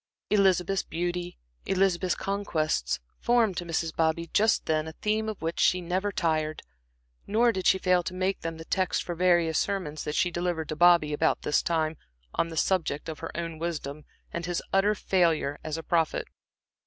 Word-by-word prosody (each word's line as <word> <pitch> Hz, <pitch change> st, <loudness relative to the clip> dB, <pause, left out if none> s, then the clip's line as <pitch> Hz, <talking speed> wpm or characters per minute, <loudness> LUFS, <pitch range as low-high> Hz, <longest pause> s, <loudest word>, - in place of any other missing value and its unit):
Elizabeth's 195 Hz, -2 st, +3 dB
beauty, 175 Hz, +1 st, -3 dB, 0.3 s
Elizabeth's 185 Hz, -2 st, +2 dB
conquests, 160 Hz, -, -1 dB, 0.2 s
formed 235 Hz, -5 st, +2 dB
to 175 Hz, -, -4 dB
Mrs. 165 Hz, -1 st, -2 dB
Bobby 165 Hz, +1 st, +1 dB
just 215 Hz, +1 st, +3 dB
then 155 Hz, 0 st, 0 dB
a 160 Hz, -, -7 dB
theme 215 Hz, +4 st, -1 dB
of 215 Hz, -, -6 dB
which 165 Hz, +1 st, -2 dB
she 185 Hz, -, +4 dB
never 185 Hz, +4 st, -1 dB
tired. 155 Hz, -4 st, -1 dB, 0.6 s
Nor 235 Hz, +3 st, +3 dB
did 190 Hz, -4 st, -2 dB
she -, -, +5 dB
fail 180 Hz, -1 st, +3 dB
to 180 Hz, -, -5 dB
make 190 Hz, +1 st, -1 dB
them 165 Hz, 0 st, -4 dB
the 160 Hz, -, -9 dB
text 185 Hz, +1 st, 0 dB
for 175 Hz, -, -4 dB
various 170 Hz, -2 st, +3 dB
sermons 180 Hz, -7 st, -2 dB
that 150 Hz, -, -3 dB
she 180 Hz, -1 st, +2 dB
delivered 175 Hz, -2 st, -2 dB
to 155 Hz, -, -2 dB
Bobby 170 Hz, -2 st, +5 dB
about 160 Hz, +2 st, +1 dB
this 150 Hz, -, +2 dB
time, 160 Hz, -2 st, 0 dB, 0.4 s
on -, -, +1 dB
the 165 Hz, -1 st, -8 dB
subject 165 Hz, -5 st, 0 dB
of 155 Hz, -, -6 dB
her 165 Hz, -, -5 dB
own 165 Hz, -2 st, -4 dB
wisdom, 155 Hz, -3 st, -4 dB, 0.3 s
and 170 Hz, 0 st, -3 dB
his 175 Hz, -1 st, -2 dB
utter 200 Hz, +2 st, +3 dB
failure 165 Hz, -7 st, +1 dB
as 155 Hz, 0 st, -3 dB
a 165 Hz, -, -6 dB
prophet. 165 Hz, -2 st, +1 dB
175 Hz, 180 wpm, -27 LUFS, 160-190 Hz, 0.6 s, she